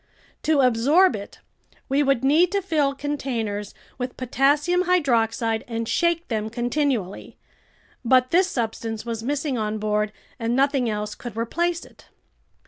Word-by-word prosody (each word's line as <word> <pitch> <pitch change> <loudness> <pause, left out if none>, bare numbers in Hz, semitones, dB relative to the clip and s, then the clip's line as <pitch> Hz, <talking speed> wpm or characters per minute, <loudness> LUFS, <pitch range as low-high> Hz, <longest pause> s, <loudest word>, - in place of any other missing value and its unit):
To 305 -2 +3
absorb 260 +7 +4
it, 200 -1 -9 0.5
we 275 +2 +2
would 275 -3 +2
need 315 +6 +4
to 400 - +1
fill 295 -6 +1
containers 240 -8 -3 0.2
with 250 0 -4
potassium 290 +8 +2
hydroxide 230 -9 +1
and 230 -1 -3
shake 340 +3 +1
them 220 -2 -2
continually. 240 -4 -2 0.7
But 255 +1 +3
this 365 +2 +4
substance 225 - -3
was 230 -1 -4
missing 280 0 -2
on 215 0 -2
board 210 0 0 0.3
and 230 +1 0
nothing 270 -2 +2
else 210 0 -3
could 240 -2 -9
replace 340 +9 -1
it. - - -19
255 Hz, 135 wpm, -23 LUFS, 225-295 Hz, 0.7 s, absorb